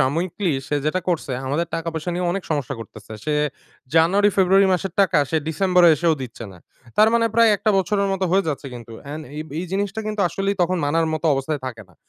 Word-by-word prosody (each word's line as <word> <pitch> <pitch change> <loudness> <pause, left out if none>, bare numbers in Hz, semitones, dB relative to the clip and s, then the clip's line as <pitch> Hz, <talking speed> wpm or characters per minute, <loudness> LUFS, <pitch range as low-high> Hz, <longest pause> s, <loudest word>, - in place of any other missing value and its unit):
সাময়িকলি 170 +6 0
সে 145 - 0
যেটা 180 +4 0
করছে, 160 -6 -1
আমাদের 160 +5 0
টাকা-পয়সা 165 +1 -3
নিয়ে 180 +1 -2
অনেক 195 -1 -3
সমস্যা 145 -6 -1
করতেছে। 110 -1 -11
সে 150 -1 0 0.6
জানুয়ারি-ফেব্রুয়ারি 195 +2 +4
মাসের 185 0 -1
টাকা 190 -5 +4
সে 160 - +1
ডিসেম্বরে 180 +1 +4
এসেও 165 +2 +2
দিচ্ছে 120 -2 -8
না। 90 - -15 0.4
তার 215 +1 +6
মানে 230 -1 +3
প্রায় 230 -1 +6
১ - - -26
টা - - +6
বছরের 200 +1 0
মতো 190 0 -1
হয়ে 195 0 +3
যাচ্ছে 145 -1 -3
কিন্তু, 115 -1 -10 0.2
এন্ড 155 +1 -6
এই - - -3 0.2
এই - - -4
জিনিসটা 200 +2 -1
কিন্তু 215 -1 -3
আসলেই 195 +2 -1
তখন 185 +2 +1
মানার 160 +3 +1
মত 155 - -3
অবস্থায় 140 +2 -2
থাকে 115 -4 -6
না। 90 - -23
170 Hz, 205 wpm, -22 LUFS, 150-195 Hz, 0.6 s, তার